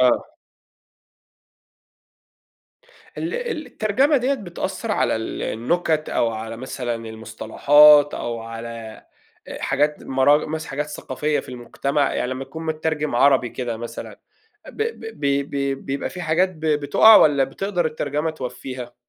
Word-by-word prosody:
آه. 125 Hz, -1 st, +2 dB, 2.9 s
ال 330 Hz, +7 st, -3 dB, 0.3 s
الترجمة 260 Hz, +8 st, +2 dB
ديّة 265 Hz, +2 st, +1 dB
بتأثّر 195 Hz, 0 st, -5 dB
على -, -, +1 dB
ال 110 Hz, -, -5 dB
النُكَت 155 Hz, +6 st, -1 dB
أو 120 Hz, -, +1 dB
على 110 Hz, 0 st, -6 dB
مثلًا 125 Hz, -1 st, -4 dB
المصطلحات 130 Hz, +7 st, +4 dB
أو 115 Hz, -1 st, -4 dB
على 115 Hz, -1 st, -8 dB, 0.4 s
آآ، -, -, -7 dB
حاجات 145 Hz, +2 st, 0 dB
مراج 140 Hz, +3 st, +3 dB
مثلًا 160 Hz, +1 st, -5 dB
حاجات 145 Hz, +2 st, -2 dB
ثقافية 150 Hz, 0 st, -2 dB
في -, -, -16 dB
المجتمع، 135 Hz, +3 st, -1 dB
يعني 125 Hz, -, -1 dB
لمّا 130 Hz, +1 st, -4 dB
تكون 160 Hz, +5 st, -8 dB
متّرجم 155 Hz, -2 st, -2 dB
عربي 130 Hz, 0 st, +4 dB
كده 120 Hz, -1 st, -4 dB
مثلًا، 120 Hz, +1 st, -8 dB, 0.5 s
ب -, -, -12 dB
ب 440 Hz, -, -4 dB
بي 140 Hz, 0 st, +1 dB
بي 140 Hz, -1 st, -2 dB
بيبقى 135 Hz, +1 st, -4 dB
فيه 180 Hz, -, -7 dB
حاجات 170 Hz, +3 st, +2 dB
ب 165 Hz, -4 st, -16 dB
بتُقَع 155 Hz, +9 st, +6 dB
والَّا 140 Hz, -6 st, +5 dB
بتقدر 180 Hz, +5 st, -2 dB
الترجمة 150 Hz, 0 st, -2 dB
توفّيها؟ 125 Hz, -3 st, -7 dB
140 Hz, 130 wpm, -22 LUFS, 125-160 Hz, 2.9 s, بتُقَع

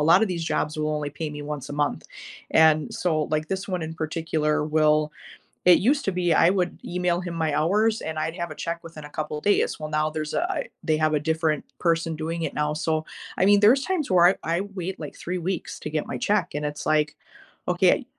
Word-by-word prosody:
lotta 170 Hz, +7 st, +6 dB
these 175 Hz, -4 st, -3 dB
jobs 155 Hz, -1 st, -1 dB
will 155 Hz, 0 st, 0 dB
only 150 Hz, -1 st, -3 dB
pay 155 Hz, +2 st, -4 dB
me 150 Hz, 0 st, -7 dB
once 145 Hz, -2 st, -5 dB
a -, -, -6 dB
month, 145 Hz, 0 st, -1 dB, 0.5 s
and 155 Hz, -1 st, +4 dB
so, 155 Hz, -4 st, 0 dB
like, 155 Hz, +1 st, -2 dB
this 190 Hz, +1 st, -3 dB
one 180 Hz, -3 st, -2 dB
in 160 Hz, 0 st, -4 dB
particular, 155 Hz, -1 st, -1 dB
will 155 Hz, 0 st, +2 dB, 0.5 s
it 180 Hz, -1 st, +7 dB
used 275 Hz, +8 st, +2 dB
to 195 Hz, -, +1 dB
be, 175 Hz, -2 st, +1 dB
I 165 Hz, +2 st, +5 dB
would 185 Hz, -2 st, -1 dB
email 180 Hz, 0 st, 0 dB
him 175 Hz, -1 st, -5 dB
my 160 Hz, -3 st, 0 dB
hours, 210 Hz, +8 st, +2 dB
and 160 Hz, 0 st, -4 dB
I'd 160 Hz, +1 st, -2 dB
have 170 Hz, -1 st, -4 dB
a -, -, -6 dB
check 170 Hz, 0 st, -4 dB
within 160 Hz, -2 st, -10 dB
a -, -, -8 dB
couple 150 Hz, 0 st, -4 dB
days, 205 Hz, +5 st, +1 dB
well, 155 Hz, -, -4 dB
now 155 Hz, 0 st, 0 dB
there's 155 Hz, -1 st, -4 dB
a -, -, +1 dB
I -, -, -3 dB, 0.2 s
they 155 Hz, -2 st, +2 dB
have 155 Hz, 0 st, +2 dB
a -, -, +3 dB
different 160 Hz, -1 st, 0 dB
person 165 Hz, -1 st, +1 dB
doing 165 Hz, +2 st, -3 dB
it -, -, -2 dB
now, 150 Hz, 0 st, 0 dB
so, 155 Hz, 0 st, -1 dB, 0.3 s
I -, -, +4 dB
mean, 205 Hz, 0 st, +6 dB
there's 255 Hz, +6 st, +5 dB
times 355 Hz, -, -1 dB
where 175 Hz, -1 st, +6 dB
I 190 Hz, -, +3 dB, 0.2 s
I 180 Hz, -, 0 dB
wait, 190 Hz, -2 st, -6 dB
like, 150 Hz, -3 st, -7 dB
3 180 Hz, +1 st, -4 dB
weeks 180 Hz, 0 st, -3 dB
to -, -, -5 dB
get 155 Hz, -1 st, -2 dB
my 125 Hz, -, -4 dB
check, 185 Hz, +3 st, 0 dB
and 150 Hz, 0 st, -2 dB
it's 145 Hz, 0 st, -5 dB
like, 155 Hz, -1 st, +2 dB, 0.5 s
"Okay" -, -, +3 dB
160 Hz, 230 wpm, -25 LUFS, 155-180 Hz, 0.5 s, it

